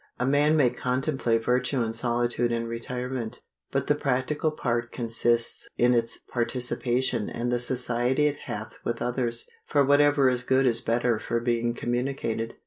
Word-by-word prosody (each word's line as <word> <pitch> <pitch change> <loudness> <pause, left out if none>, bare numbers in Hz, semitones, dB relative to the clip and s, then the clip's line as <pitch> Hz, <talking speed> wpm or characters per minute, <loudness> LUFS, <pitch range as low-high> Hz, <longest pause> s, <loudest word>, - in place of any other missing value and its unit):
A 125 - +1
man 145 +3 +3
may 130 -5 +4
contemplate 125 -2 0
virtue 125 +1 +1
in 110 0 -2
solitude 120 0 0
and 115 0 -1
retirement; 125 0 -4 0.3
but - - 0
the - - +3
practical 145 +2 0
part 120 -5 -2
consists 115 0 0
in 125 +1 +4
its 115 -1 0
participation 120 -1 -1
and 120 +1 -2
the 120 - +1
society 125 +2 +1
it 145 -1 0
hath 110 +1 -6
with 120 0 -2
others; 120 -1 -1 0.2
for 145 -2 +3
whatever 145 0 +5
is 125 -1 +2
good 130 +2 +2
is 115 -2 +2
better 120 0 +1
for 115 - -1
being 120 0 0
communicated. 120 -2 -2
120 Hz, 155 wpm, -26 LUFS, 120-130 Hz, 0.3 s, whatever